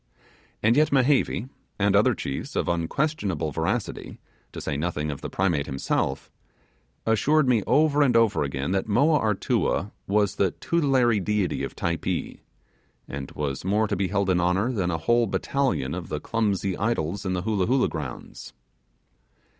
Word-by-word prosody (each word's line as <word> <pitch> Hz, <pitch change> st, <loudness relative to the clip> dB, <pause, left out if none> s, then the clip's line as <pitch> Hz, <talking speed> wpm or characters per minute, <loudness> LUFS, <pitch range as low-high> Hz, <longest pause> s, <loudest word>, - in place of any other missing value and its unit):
And 110 Hz, +2 st, +4 dB
yet 155 Hz, +2 st, +3 dB
Mehevi, 135 Hz, -3 st, +2 dB, 0.3 s
and 100 Hz, 0 st, +2 dB
other 100 Hz, -, +4 dB
chiefs 65 Hz, -, -5 dB
of -, -, 0 dB
unquestionable 85 Hz, -, -1 dB
veracity -, -, -3 dB, 0.3 s
to -, -, -7 dB
say -, -, -3 dB
nothing 75 Hz, 0 st, -2 dB
of 70 Hz, -, -7 dB
the -, -, -5 dB
Primate 85 Hz, -7 st, 0 dB
himself 65 Hz, 0 st, -2 dB, 0.7 s
assured 140 Hz, +7 st, +3 dB
me 120 Hz, -4 st, +3 dB
over 150 Hz, -1 st, +3 dB
and 125 Hz, -5 st, +4 dB
over 115 Hz, -2 st, +3 dB
again 70 Hz, +3 st, -2 dB
that 95 Hz, +2 st, 0 dB
Moa 145 Hz, +8 st, +3 dB
Artua 105 Hz, -1 st, 0 dB, 0.2 s
was 100 Hz, 0 st, +1 dB
the 95 Hz, -, +3 dB
tutelary 135 Hz, -9 st, +2 dB
deity 100 Hz, -1 st, -1 dB
of -, -, -5 dB
Typee, 85 Hz, -1 st, -2 dB, 0.7 s
and 70 Hz, -1 st, -6 dB
was 70 Hz, -2 st, -3 dB
more 105 Hz, +4 st, +1 dB
to -, -, -1 dB
be 95 Hz, +1 st, 0 dB
held 100 Hz, 0 st, 0 dB
in 90 Hz, -1 st, +2 dB
honour 95 Hz, +7 st, +1 dB
than 95 Hz, -7 st, -1 dB
a 80 Hz, -, -1 dB
whole 120 Hz, +8 st, +2 dB
battalion 130 Hz, -, -1 dB
of 90 Hz, -1 st, -6 dB
the 75 Hz, -, -3 dB
clumsy 100 Hz, -3 st, -1 dB
idols 100 Hz, -4 st, -1 dB
in 95 Hz, -1 st, -1 dB
the 90 Hz, -1 st, -2 dB
Hoolah 100 Hz, -3 st, 0 dB
Hoolah 130 Hz, +2 st, +2 dB
grounds. 70 Hz, -7 st, -7 dB
100 Hz, 160 wpm, -25 LUFS, 85-120 Hz, 0.7 s, And